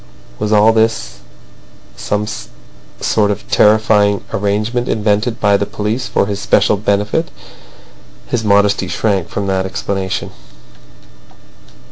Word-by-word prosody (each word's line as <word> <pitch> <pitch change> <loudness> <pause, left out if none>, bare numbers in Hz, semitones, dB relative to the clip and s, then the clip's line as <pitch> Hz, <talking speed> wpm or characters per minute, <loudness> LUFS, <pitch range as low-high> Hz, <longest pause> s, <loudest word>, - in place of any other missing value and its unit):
Was 105 - -2
all 110 +1 +5
this 110 - 0 0.8
a - - -18
some 105 0 -1 0.8
sort 105 -1 +1
of 105 0 -4
terrifying 105 -1 +3
arrangement 105 +5 -1
invented 110 +2 0
by 100 -1 +3
the 100 - -2
police 105 +4 -3
for - - +1
his 100 0 -4
especial 105 +1 +2
benefit? 105 +9 -1 1.0
His 115 -2 -2
modesty 100 -2 +2
shrank 95 -3 -1
from 100 - -3
that 95 -1 -1
explanation. 95 0 -3
105 Hz, 115 wpm, -16 LUFS, 100-110 Hz, 1.0 s, all